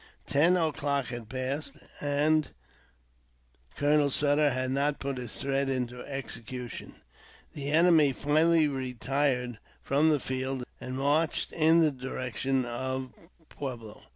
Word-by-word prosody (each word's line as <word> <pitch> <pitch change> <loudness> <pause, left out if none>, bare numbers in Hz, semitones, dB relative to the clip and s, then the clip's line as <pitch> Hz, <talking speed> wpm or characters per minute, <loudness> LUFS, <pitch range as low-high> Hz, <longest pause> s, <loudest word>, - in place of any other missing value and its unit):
Ten 165 +6 +3
o'clock 145 -5 0
had 120 -3 -7
passed, 135 +3 -3 0.2
and 150 +2 +2 1.3
Colonel 145 0 +3
Sutter 145 +2 +3
had 130 -1 -1
not 140 +2 +1
put 135 -2 -3
his 120 -3 -5
threat 135 0 -1
into 125 -2 -2
execution. 125 -3 -6 0.6
The 140 -1 -4
enemy 160 -2 +5
finally 155 +4 +3
retired 130 -2 -1 0.2
from 145 +3 +3
the 150 -2 +3
field, 130 0 -3 0.2
and 130 +1 -5
marched 145 +4 +1
in 165 +1 +4
the 155 -2 +4
direction 130 0 -2
of 130 +1 -4 0.3
Pueblo. 120 -7 -7
135 Hz, 120 wpm, -29 LUFS, 130-150 Hz, 1.3 s, enemy